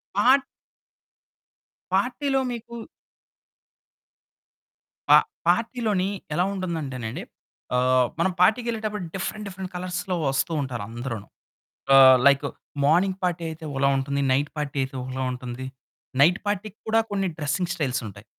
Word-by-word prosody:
ఆ 245 Hz, +6 st, +6 dB, 1.6 s
పార్టీలో 265 Hz, +7 st, +1 dB
మీకు 235 Hz, 0 st, -7 dB, 2.3 s
పా -, -, +10 dB, 0.3 s
పార్టీలోని 225 Hz, -5 st, +1 dB, 0.3 s
ఎలా 175 Hz, -, +2 dB
ఉంటుందంటేనండి 145 Hz, -, -4 dB, 0.5 s
ఆహ్, 125 Hz, 0 st, +3 dB
మనం 185 Hz, +2 st, +2 dB
పార్టీకెళ్ళేటప్పుడు 215 Hz, 0 st, +1 dB
డిఫరెంట్ 210 Hz, +3 st, -4 dB
డిఫరెంట్ 190 Hz, -1 st, -7 dB
కలర్స్‌లో 180 Hz, +1 st, -3 dB
వస్తూ 135 Hz, +5 st, 0 dB
ఉంటారు 125 Hz, -5 st, -4 dB
అందరును. 115 Hz, -3 st, -5 dB, 0.7 s
ఆహ్, 130 Hz, -1 st, +9 dB
లైక్ 140 Hz, +1 st, +4 dB, 0.4 s
మార్నింగ్ 185 Hz, +5 st, +3 dB
పార్టీ 175 Hz, -2 st, 0 dB
అయితే 160 Hz, +1 st, -9 dB
ఒకలా 140 Hz, 0 st, +2 dB
ఉంటుంది. 140 Hz, +1 st, -1 dB
నైట్ 145 Hz, +3 st, +2 dB
పార్టీ 145 Hz, -1 st, -3 dB
అయితే 130 Hz, 0 st, -7 dB
ఒకలా 130 Hz, +1 st, -4 dB
ఉంటుంది. 125 Hz, +1 st, -6 dB, 0.6 s
నైట్ 175 Hz, +6 st, +5 dB
పార్టీ‌కి 205 Hz, +1 st, -3 dB
కూడా 225 Hz, +1 st, +3 dB
కొన్ని 195 Hz, -1 st, 0 dB
డ్రెసింగ్ 155 Hz, +4 st, -1 dB
స్టైల్స్ 140 Hz, -8 st, -1 dB
ఉంటాయి. 100 Hz, +1 st, -12 dB
170 Hz, 115 wpm, -25 LUFS, 135-200 Hz, 2.3 s, పా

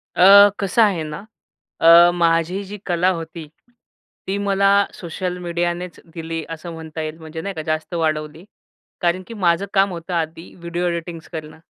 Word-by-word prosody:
अ, 200 Hz, +2 st, +8 dB
कसं 195 Hz, +3 st, +1 dB
आहे 195 Hz, -7 st, +3 dB
ना, 155 Hz, +6 st, -7 dB, 0.6 s
अ, 170 Hz, +1 st, +8 dB
माझी 170 Hz, +2 st, +1 dB
जी 205 Hz, +2 st, -8 dB
कला 180 Hz, +1 st, +2 dB
होती, 165 Hz, -2 st, -6 dB, 0.8 s
ती 195 Hz, -, -1 dB
मला 200 Hz, -1 st, +2 dB, 0.2 s
सोशल 180 Hz, +1 st, -5 dB
मीडियानेच 175 Hz, 0 st, -3 dB
दिली 165 Hz, -1 st, -4 dB
असं 165 Hz, +1 st, -7 dB
म्हणता 160 Hz, -1 st, -8 dB
येईल. 155 Hz, +1 st, -6 dB
म्हणजे 160 Hz, 0 st, -8 dB
नाही 195 Hz, +3 st, -5 dB
का 155 Hz, -, -5 dB
जास्त 155 Hz, +2 st, -3 dB
वाढवली. 155 Hz, 0 st, -2 dB, 0.6 s
कारण 175 Hz, +1 st, 0 dB
की 230 Hz, -, -9 dB
माझं 185 Hz, -2 st, +1 dB
काम 195 Hz, 0 st, +3 dB
होतं 170 Hz, +1 st, -7 dB
आधी 165 Hz, +1 st, -4 dB
व्हिडिओ 170 Hz, +1 st, -3 dB
एडिटिंग्स 170 Hz, -1 st, -5 dB
करणं. 155 Hz, -1 st, -7 dB
170 Hz, 160 wpm, -20 LUFS, 160-185 Hz, 0.8 s, अ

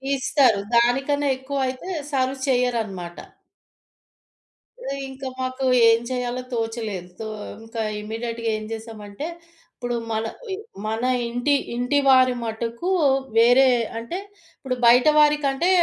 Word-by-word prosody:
ఇస్తారు. 260 Hz, -5 st, +3 dB, 0.2 s
దానికన్నా 270 Hz, +5 st, +2 dB
ఎక్కువైతే 265 Hz, +3 st, -3 dB, 0.2 s
సర్వ్ 265 Hz, 0 st, 0 dB
చెయ్యరనమాట. 225 Hz, -9 st, -1 dB, 1.6 s
హ్మ్. 275 Hz, -, -4 dB
ఇంకా 265 Hz, 0 st, -7 dB
మాకు 255 Hz, +1 st, -2 dB, 0.2 s
ఏం 230 Hz, 0 st, +5 dB
చేయాలో 250 Hz, 0 st, -2 dB
తోచలేదు. 225 Hz, -6 st, -3 dB
తో 220 Hz, -, -4 dB, 0.4 s
ఇంకా 225 Hz, 0 st, -5 dB, 0.2 s
ఇమ్మీడియేట్‌గా 230 Hz, +1 st, -4 dB
ఏం 215 Hz, -, -7 dB
చేశామంటే 220 Hz, +4 st, -7 dB, 0.5 s
ఇప్పుడు 245 Hz, -1 st, -3 dB, 0.2 s
మల 220 Hz, 0 st, -1 dB, 0.3 s
ఇ -, -, -1 dB, 0.3 s
మన 220 Hz, +2 st, -2 dB, 0.2 s
ఇంటి 245 Hz, +5 st, 0 dB, 0.2 s
ఇంటి 250 Hz, +4 st, +1 dB
వారి 255 Hz, -1 st, +6 dB
మటుకు 230 Hz, +8 st, -3 dB, 0.5 s
వేరే 245 Hz, +3 st, +6 dB, 0.3 s
అంటే 235 Hz, +11 st, -5 dB, 0.4 s
ఇప్పుడు 255 Hz, -2 st, -3 dB
బయట 245 Hz, +3 st, +6 dB
వారికంటే 295 Hz, +2 st, +3 dB
245 Hz, 110 wpm, -23 LUFS, 225-265 Hz, 1.6 s, వారి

